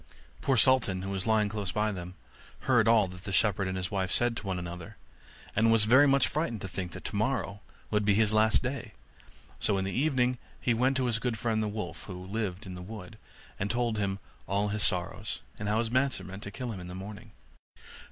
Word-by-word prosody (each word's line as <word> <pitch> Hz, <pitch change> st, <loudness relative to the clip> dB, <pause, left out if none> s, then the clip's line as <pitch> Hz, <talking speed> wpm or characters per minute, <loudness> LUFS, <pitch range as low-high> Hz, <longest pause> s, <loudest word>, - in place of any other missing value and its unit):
Poor 135 Hz, -2 st, +2 dB
Sultan, 105 Hz, -7 st, +4 dB
who 95 Hz, -, -4 dB
was 95 Hz, +1 st, -2 dB
lying 110 Hz, -1 st, +3 dB
close 100 Hz, -3 st, -3 dB
by 105 Hz, +2 st, +1 dB
them, 90 Hz, -2 st, -7 dB, 0.5 s
heard 120 Hz, -4 st, +3 dB
all 110 Hz, -3 st, +5 dB
that 90 Hz, +1 st, -11 dB
the 100 Hz, -, -5 dB
shepherd 100 Hz, 0 st, +2 dB
and 95 Hz, 0 st, -2 dB
his 90 Hz, +1 st, -3 dB
wife 95 Hz, -2 st, -1 dB
said 120 Hz, -1 st, +2 dB
to 115 Hz, -, -6 dB
one 95 Hz, -1 st, -1 dB
another, 90 Hz, -1 st, -7 dB, 0.6 s
and 115 Hz, +1 st, +4 dB
was 115 Hz, -1 st, +6 dB
very 130 Hz, +6 st, +7 dB
much 135 Hz, -1 st, +4 dB
frightened 150 Hz, -7 st, -2 dB
to 95 Hz, -, -4 dB
think 90 Hz, -1 st, -5 dB
tomorrow 105 Hz, -2 st, -1 dB, 0.3 s
would 105 Hz, -1 st, +2 dB
be 100 Hz, -1 st, +3 dB
his 110 Hz, 0 st, +3 dB
last 110 Hz, +3 st, +4 dB
day; 125 Hz, -4 st, -4 dB, 0.7 s
so 100 Hz, -, +1 dB
in 95 Hz, -, -1 dB
the 95 Hz, -, -2 dB
evening 130 Hz, -3 st, +1 dB, 0.2 s
he 120 Hz, -, +1 dB
went 130 Hz, +3 st, +2 dB
to 130 Hz, -, +1 dB
his 115 Hz, -3 st, +1 dB
good 120 Hz, -2 st, -1 dB
friend 110 Hz, -1 st, 0 dB
the 110 Hz, -, 0 dB
wolf, 100 Hz, -6 st, -5 dB
who 90 Hz, -2 st, -7 dB
lived 100 Hz, -1 st, -3 dB
in 95 Hz, -, -7 dB
the 90 Hz, -, -7 dB
wood, 105 Hz, +1 st, -9 dB, 0.4 s
and 100 Hz, -, -1 dB
told 120 Hz, -2 st, 0 dB
him 100 Hz, -1 st, 0 dB, 0.3 s
all 100 Hz, +2 st, +1 dB
his 105 Hz, +1 st, -2 dB
sorrows, 90 Hz, -2 st, +1 dB, 0.2 s
and 105 Hz, -, -3 dB
how 105 Hz, -, +2 dB
his 115 Hz, 0 st, 0 dB
master 130 Hz, -5 st, +1 dB
meant 95 Hz, +2 st, -8 dB
to 100 Hz, -, -5 dB
kill 125 Hz, +2 st, -5 dB
him 100 Hz, -, -6 dB
in 90 Hz, -, -8 dB
the 90 Hz, -, -7 dB
morning. 100 Hz, +2 st, -8 dB
105 Hz, 220 wpm, -29 LUFS, 95-115 Hz, 0.7 s, very